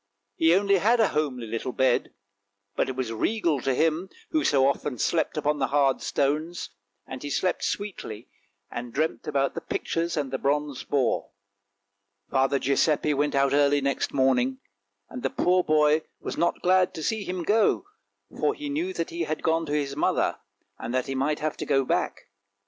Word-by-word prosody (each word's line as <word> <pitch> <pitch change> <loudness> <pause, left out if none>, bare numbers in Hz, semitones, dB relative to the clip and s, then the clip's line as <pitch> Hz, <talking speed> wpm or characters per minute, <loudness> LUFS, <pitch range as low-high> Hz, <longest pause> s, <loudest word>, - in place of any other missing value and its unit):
He 165 +6 +4
only 200 0 +3
had 230 +6 +3
a 220 - +4
homely 140 -6 -1
little 115 +3 -4
bed, 130 -2 +2 0.6
but - - 0
it 130 - -4
was 125 -3 -3
regal 165 - 0
to 135 0 0
him, 165 +5 +1 0.2
who 310 -1 +1
so 135 -2 +3
often 140 -1 -1
slept 160 +7 0
upon 150 0 0
the 135 - +1
hard 135 0 +2
stones, 155 +5 -1 0.3
and 130 -1 -8
he 145 - -5
slept 180 +5 0
sweetly 155 - -4 0.4
and 120 0 -5
dreamt 155 +4 -2
about 140 -2 +1
the - - -5
pictures 165 0 -2
and 140 -3 -2
the 135 - -2
bronze 145 -1 -1
boar. 135 -4 0 1.0
Father 135 0 +2
Giuseppe 145 +3 +2
went 145 0 0
out 140 0 +3
early 145 0 +4
next 140 0 -1
morning, 130 -1 +2 0.5
and 125 - -8
the 135 - 0
poor 180 +5 +2
boy 155 0 +3 0.2
was - - -5
not 170 - 0
glad 185 0 +3
to 160 - -5
see 220 +3 -1
him 180 -2 -4
go, 220 - +2 0.5
for 425 - +1
he 295 -1 -6
knew 335 +6 -2
that - - -3
he 340 0 -2
had 155 - -4
gone 165 0 +1
to - - -4
his 140 -2 -1
mother, 150 - +1 0.4
and 120 +2 -4
that 130 - +1
he 135 - -4
might 135 +3 0
have 155 0 -2
to - - -4
go 135 -2 +2
back. - - -1
145 Hz, 185 wpm, -26 LUFS, 135-170 Hz, 1.0 s, He